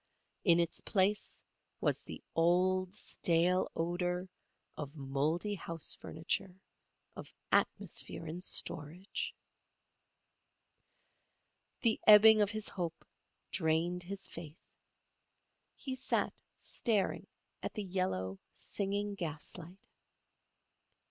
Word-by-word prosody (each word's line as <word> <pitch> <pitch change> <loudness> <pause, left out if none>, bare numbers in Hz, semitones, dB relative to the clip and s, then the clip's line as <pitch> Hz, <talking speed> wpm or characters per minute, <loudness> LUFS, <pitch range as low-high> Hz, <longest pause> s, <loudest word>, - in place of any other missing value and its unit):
In 170 -4 +6
its 170 -1 0
place 205 0 +1 0.4
was - - +1
the - - -9
old, 180 +2 +3
stale 175 +1 +2
odour 180 +2 -1 0.5
of 145 0 -6
mouldy 150 +8 0
house 165 -4 -3
furniture, 180 +3 -3 0.6
of - - -9 0.2
atmosphere - - 0
in 165 +3 -5
storage. 175 +1 0 2.5
The 225 -2 +3
ebbing 215 0 +10
of 205 - +3
his 215 0 -2
hope 170 -3 -4 0.5
drained 170 +1 +1
his 195 +2 -5
faith. 160 -1 -9 1.2
He 265 - -5
sat 260 0 0 0.2
staring 210 -5 0 0.3
at - - -4
the 210 - -2
yellow, 175 - -1
singing 205 +1 -2
gaslight. 175 +1 -5
180 Hz, 90 wpm, -34 LUFS, 165-200 Hz, 2.5 s, ebbing